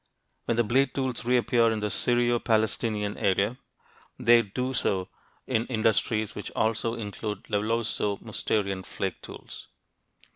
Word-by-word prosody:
When 115 Hz, -, 0 dB
the 120 Hz, -, +4 dB
blade 130 Hz, +4 st, +2 dB
tools 130 Hz, -4 st, -1 dB
reappear 120 Hz, -1 st, +3 dB
in 110 Hz, -1 st, -1 dB
the 105 Hz, -1 st, -2 dB
Syro 120 Hz, 0 st, +2 dB
Palestinian 110 Hz, -2 st, 0 dB
area, 100 Hz, +5 st, +1 dB, 0.6 s
they 120 Hz, 0 st, +6 dB
do 125 Hz, +5 st, -3 dB
so 95 Hz, -5 st, 0 dB, 0.4 s
in 120 Hz, -3 st, 0 dB
industries 110 Hz, -2 st, +1 dB
which 105 Hz, -, -6 dB
also 115 Hz, +1 st, 0 dB
include 105 Hz, -2 st, -5 dB
Levalloiso 105 Hz, -1 st, -1 dB
Mousterian 100 Hz, -3 st, -2 dB
flake -, -, -4 dB
tools. -, -, -10 dB
115 Hz, 130 wpm, -27 LUFS, 105-120 Hz, 0.6 s, they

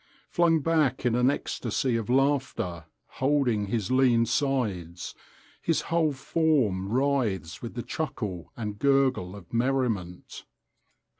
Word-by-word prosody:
Flung 165 Hz, -2 st, +3 dB
back 150 Hz, -5 st, +1 dB
in 120 Hz, -, +3 dB
an 125 Hz, +2 st, +3 dB
ecstasy 125 Hz, -2 st, -1 dB
of 115 Hz, -1 st, -2 dB
laughter, 125 Hz, -, 0 dB, 0.4 s
holding 130 Hz, -7 st, +2 dB
his 110 Hz, +1 st, -2 dB
lean 125 Hz, -3 st, +4 dB
sides, 105 Hz, -, -1 dB, 0.5 s
his 165 Hz, -, +1 dB
whole 165 Hz, -2 st, +1 dB
form 130 Hz, -, +1 dB
writhes 120 Hz, -, 0 dB
with 115 Hz, -, -7 dB
the 120 Hz, -, -3 dB
chuckle 105 Hz, -, -4 dB
and 105 Hz, -3 st, -5 dB
gurgle 135 Hz, -9 st, +2 dB
of 95 Hz, -1 st, -13 dB
merriment. 115 Hz, -8 st, -1 dB
125 Hz, 120 wpm, -27 LUFS, 100-140 Hz, 0.5 s, lean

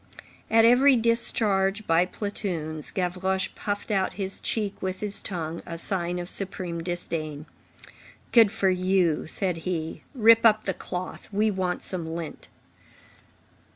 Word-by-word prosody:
At 225 Hz, 0 st, +5 dB
every 260 Hz, +3 st, +6 dB
discharge 215 Hz, -3 st, +2 dB
by 165 Hz, +2 st, +3 dB
platoons, 175 Hz, -7 st, -4 dB
Gavroche 190 Hz, +1 st, -1 dB
puffed 205 Hz, +1 st, -4 dB
out 190 Hz, -2 st, +1 dB
his 195 Hz, -1 st, -4 dB
cheek 210 Hz, -3 st, -2 dB
with 185 Hz, 0 st, -3 dB
his 205 Hz, -1 st, -2 dB
tongue, 165 Hz, -3 st, -4 dB
a 165 Hz, -, -7 dB
sign 175 Hz, 0 st, -1 dB
of 175 Hz, 0 st, -4 dB
supreme 185 Hz, -3 st, -3 dB
disdain. 160 Hz, -3 st, -4 dB, 0.9 s
"Good 225 Hz, -4 st, +6 dB
for 200 Hz, -4 st, +2 dB
you," 185 Hz, -4 st, +1 dB
said 180 Hz, +1 st, -1 dB
he, 165 Hz, -1 st, -4 dB
"rip 230 Hz, -1 st, +6 dB
up 215 Hz, -1 st, +5 dB
the 190 Hz, -, 0 dB
cloth. 180 Hz, 0 st, -6 dB
We 210 Hz, +2 st, +2 dB
want 185 Hz, -2 st, -2 dB
some 175 Hz, -4 st, -3 dB
lint." 165 Hz, -3 st, -7 dB
190 Hz, 135 wpm, -26 LUFS, 175-210 Hz, 0.9 s, every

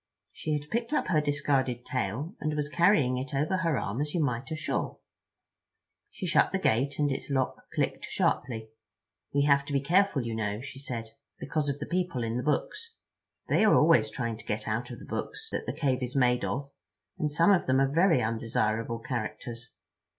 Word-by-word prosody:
She 155 Hz, -, -3 dB
had 150 Hz, +1 st, -10 dB
picked 235 Hz, +4 st, -1 dB
up -, -, +1 dB
her 155 Hz, -4 st, +3 dB
discarded 135 Hz, -4 st, 0 dB
tail 130 Hz, -, -2 dB
and 155 Hz, 0 st, -1 dB
was 150 Hz, -1 st, -1 dB
carrying 150 Hz, -8 st, +3 dB
it 135 Hz, +2 st, -5 dB
over 150 Hz, +7 st, +1 dB
her 165 Hz, -6 st, +1 dB
arm 115 Hz, +4 st, -2 dB
as 150 Hz, +2 st, -2 dB
you -, -, +1 dB
might 125 Hz, -2 st, -2 dB
a 160 Hz, -, -2 dB
shawl. 155 Hz, -, -2 dB, 1.1 s
She -, -, -6 dB
shut -, -, +3 dB
the -, -, +1 dB
gate, 135 Hz, +5 st, +1 dB
and 145 Hz, -1 st, +2 dB
its 135 Hz, -, -4 dB
lock 130 Hz, -2 st, -1 dB
clicked -, -, -1 dB
sharply. 110 Hz, -3 st, -1 dB, 0.6 s
"We 140 Hz, 0 st, +2 dB
have 140 Hz, -1 st, +4 dB
to 145 Hz, -, -5 dB
be 140 Hz, -, +3 dB
careful, 170 Hz, 0 st, +2 dB
you 115 Hz, -1 st, -3 dB
know," 105 Hz, -2 st, -2 dB
she 135 Hz, +2 st, -8 dB
said, 115 Hz, -5 st, -5 dB, 0.3 s
"because 150 Hz, -3 st, -1 dB
of 140 Hz, -, -1 dB
the -, -, -5 dB
people 175 Hz, -8 st, -1 dB
in 115 Hz, 0 st, -2 dB
the 125 Hz, -, 0 dB
books. 430 Hz, -, -2 dB, 0.5 s
They -, -, +3 dB
are 215 Hz, -, +6 dB
always 150 Hz, -9 st, +5 dB
trying 115 Hz, 0 st, -3 dB
to 110 Hz, -, -13 dB
get 105 Hz, 0 st, -3 dB
out 115 Hz, +3 st, -2 dB
of 120 Hz, -, -7 dB
the -, -, -11 dB
books 445 Hz, -, -5 dB
that -, -, -3 dB
the -, -, 0 dB
cave 135 Hz, -4 st, 0 dB
is 125 Hz, +1 st, -3 dB
made 125 Hz, -2 st, +3 dB
of; 140 Hz, +1 st, -3 dB, 0.5 s
and 150 Hz, -1 st, 0 dB
some 165 Hz, +6 st, +4 dB
of 190 Hz, -, +3 dB
them 130 Hz, +1 st, +4 dB
are 135 Hz, -, +4 dB
very 160 Hz, -, +3 dB
undesirable 115 Hz, 0 st, 0 dB
characters. 120 Hz, -1 st, -5 dB
135 Hz, 200 wpm, -29 LUFS, 120-150 Hz, 1.1 s, are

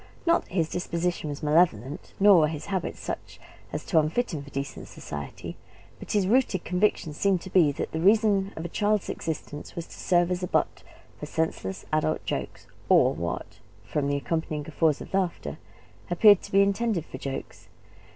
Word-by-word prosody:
Not 335 Hz, 0 st, +4 dB
that -, -, -17 dB
his 165 Hz, -4 st, +2 dB
disposition 175 Hz, -2 st, -2 dB
was 145 Hz, +1 st, -6 dB
malevolent, 150 Hz, -4 st, +1 dB
nor 200 Hz, -2 st, +7 dB
were 155 Hz, -, +4 dB
his 150 Hz, -1 st, -5 dB
habits 190 Hz, -, -2 dB
such -, -, -6 dB, 0.3 s
as -, -, -4 dB
to 165 Hz, -, +4 dB
unfit 165 Hz, +9 st, 0 dB
him 150 Hz, -, -3 dB
for 140 Hz, -, -12 dB
decent 140 Hz, 0 st, -5 dB
society; 75 Hz, -2 st, -7 dB, 0.4 s
but -, -, -6 dB
his 205 Hz, -3 st, +3 dB
rooted 220 Hz, -3 st, +2 dB
conviction 180 Hz, -4 st, +1 dB
seemed 190 Hz, +3 st, +1 dB
to 190 Hz, -, -9 dB
be 165 Hz, -6 st, +5 dB
that -, -, -4 dB
the 160 Hz, -, -2 dB
reason 200 Hz, +1 st, +3 dB
of 160 Hz, -, -5 dB
a -, -, -1 dB
child's 210 Hz, +3 st, 0 dB
existence 150 Hz, -2 st, -5 dB
was 170 Hz, -, -4 dB
to -, -, -13 dB
serve 175 Hz, -1 st, +2 dB
as 180 Hz, 0 st, -1 dB
a 180 Hz, -, -2 dB
butt -, -, 0 dB, 0.4 s
for 150 Hz, -, -6 dB
senseless 150 Hz, -13 st, -2 dB
adult 155 Hz, 0 st, +1 dB
jokes, -, -, -4 dB, 0.2 s
or -, -, +5 dB
what, 85 Hz, 0 st, -5 dB, 0.2 s
from 140 Hz, +8 st, -1 dB
the 140 Hz, 0 st, +1 dB
accompanying 155 Hz, 0 st, -2 dB
guffaws 155 Hz, 0 st, +1 dB
of -, -, -10 dB
laughter, 175 Hz, -, -1 dB, 0.5 s
appeared 205 Hz, +3 st, +6 dB
to -, -, -10 dB
be 195 Hz, +1 st, +6 dB
intended 200 Hz, -3 st, 0 dB
for 130 Hz, -, -9 dB
jokes. 135 Hz, 0 st, -6 dB
170 Hz, 185 wpm, -27 LUFS, 150-195 Hz, 0.5 s, nor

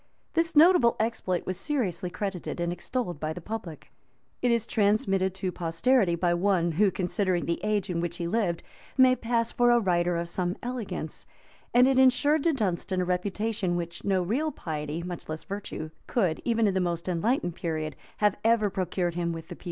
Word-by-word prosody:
This 330 Hz, 0 st, +1 dB
notable 305 Hz, -6 st, +6 dB
exploit 215 Hz, -5 st, -1 dB
was 185 Hz, -1 st, -3 dB
seriously 195 Hz, -, -1 dB
credited 180 Hz, -1 st, -4 dB
and 170 Hz, 0 st, -1 dB
extolled 180 Hz, -, -3 dB
by 155 Hz, +1 st, -2 dB
the 180 Hz, -, -7 dB
public; 180 Hz, -4 st, -7 dB, 0.5 s
it 250 Hz, -, +2 dB
is 235 Hz, -2 st, +2 dB
transmitted 200 Hz, -4 st, +1 dB
to 190 Hz, -1 st, -2 dB
posterity 175 Hz, +4 st, +2 dB
by 175 Hz, 0 st, +1 dB
one, 175 Hz, -1 st, +2 dB
who, 195 Hz, +6 st, +3 dB
considering 185 Hz, -1 st, 0 dB
the 170 Hz, -, -1 dB
age 210 Hz, -2 st, 0 dB
in 175 Hz, -3 st, -2 dB
which 175 Hz, 0 st, -3 dB
he 170 Hz, -, -3 dB
lived, 175 Hz, -2 st, 0 dB, 0.3 s
may 260 Hz, -1 st, +6 dB
pass 230 Hz, -1 st, 0 dB
for 240 Hz, 0 st, +3 dB
a 240 Hz, 0 st, +5 dB
writer 175 Hz, -4 st, +1 dB
of 170 Hz, 0 st, -2 dB
some 180 Hz, +1 st, -2 dB
elegance;[] 220 Hz, -10 st, -5 dB, 0.4 s
and 250 Hz, +1 st, +6 dB
it 265 Hz, -1 st, +3 dB
insured 270 Hz, +4 st, +4 dB
to 335 Hz, -, +4 dB
Dunstan 190 Hz, -5 st, -1 dB
a -, -, 0 dB
reputation 185 Hz, +1 st, -1 dB
which 170 Hz, -1 st, -4 dB
no 190 Hz, -2 st, +1 dB
real 270 Hz, -, 0 dB
piety, 155 Hz, -, -4 dB
much 175 Hz, -2 st, -7 dB
less 155 Hz, 0 st, -4 dB
virtue, 195 Hz, -6 st, -6 dB, 0.2 s
could, 185 Hz, -10 st, 0 dB
even 230 Hz, -2 st, +2 dB
in 200 Hz, -, +2 dB
the 190 Hz, -, +1 dB
most 170 Hz, -1 st, -2 dB
enlightened 180 Hz, +1 st, 0 dB
period, 155 Hz, -3 st, -3 dB, 0.2 s
have 210 Hz, -1 st, +3 dB
ever 225 Hz, -3 st, +3 dB
procured 180 Hz, -1 st, -1 dB
him 170 Hz, 0 st, -1 dB
with 165 Hz, -1 st, -7 dB
the -, -, -6 dB
people. -, -, -25 dB
185 Hz, 190 wpm, -27 LUFS, 175-230 Hz, 0.5 s, notable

